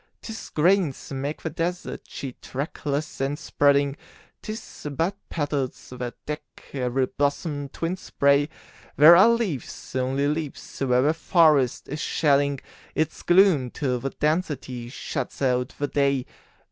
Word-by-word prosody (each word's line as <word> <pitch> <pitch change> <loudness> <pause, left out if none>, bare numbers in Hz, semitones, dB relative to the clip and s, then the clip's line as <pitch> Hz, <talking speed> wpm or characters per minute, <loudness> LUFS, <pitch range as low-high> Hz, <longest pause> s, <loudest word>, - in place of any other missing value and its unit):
'Tis 225 -1 -8
grains 170 -3 +1
make 140 +3 -4
the 160 - -1
desert 175 +3 -3
sheet, 135 -3 -7
trackless 145 +1 -4
and 140 +2 0
spreading; 140 -3 +2 0.5
'Tis 215 -7 -7
but 170 +6 0
petals 145 -5 -3
that 125 -1 -5
deck 150 0 -3 0.3
every 130 -1 0
blossom 145 +1 -2
twinned 170 +6 -3
spray; 140 -3 +2 0.5
There 155 +4 +9
are 190 +6 +7
leaves 210 - -2
only 130 +2 +1
leaves 150 -1 -4
where 125 -2 +3
the 150 +3 +3
forest 155 -6 +3
is 150 +3 -5
shedding 140 -2 +2 0.3
Its 155 0 -1
gloom 175 -8 +4
till 125 -2 -1
the 135 - -2
density 150 -6 -2
shuts 130 - -5
out 125 -1 0
the 145 - -1
day. 140 -2 +1
145 Hz, 135 wpm, -25 LUFS, 135-160 Hz, 0.5 s, There